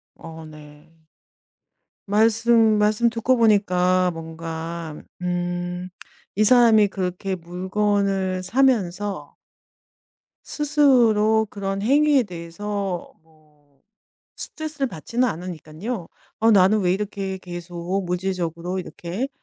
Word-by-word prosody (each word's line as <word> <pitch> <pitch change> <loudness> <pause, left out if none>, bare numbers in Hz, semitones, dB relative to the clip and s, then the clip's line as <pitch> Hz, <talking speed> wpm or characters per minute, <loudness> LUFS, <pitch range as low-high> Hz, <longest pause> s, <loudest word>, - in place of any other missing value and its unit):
어, 160 0 -10
네. 150 0 -14 1.2
말씀 225 +1 +3
말씀 210 +3 +3
듣고 235 +2 +1
보니까 185 -4 +3
뭔가 165 0 -6 0.3
음 175 0 -3 0.5
이 215 - +3
사람이 225 -3 +6
그렇게 190 0 -3
물건을 190 +1 -1
사면서 205 -4 0 1.1
스스로 235 -8 +3
그런 195 -1 -4
행위에 280 +3 +4
대해서 185 +1 -5
뭐 150 -3 -30 0.6
스트레스를 310 -3 -4
받지는 235 - -1
않으니깐요. 175 +3 -6 0.3
'어 225 +1 +5
나는 205 +1 +5
왜 180 -2 +2
이렇게 195 -1 -3
계속 175 +1 -5
물질적으로 180 -1 -3
이렇게 185 +7 -5
190 Hz, 215 characters per minute, -23 LUFS, 175-220 Hz, 1.2 s, 사람이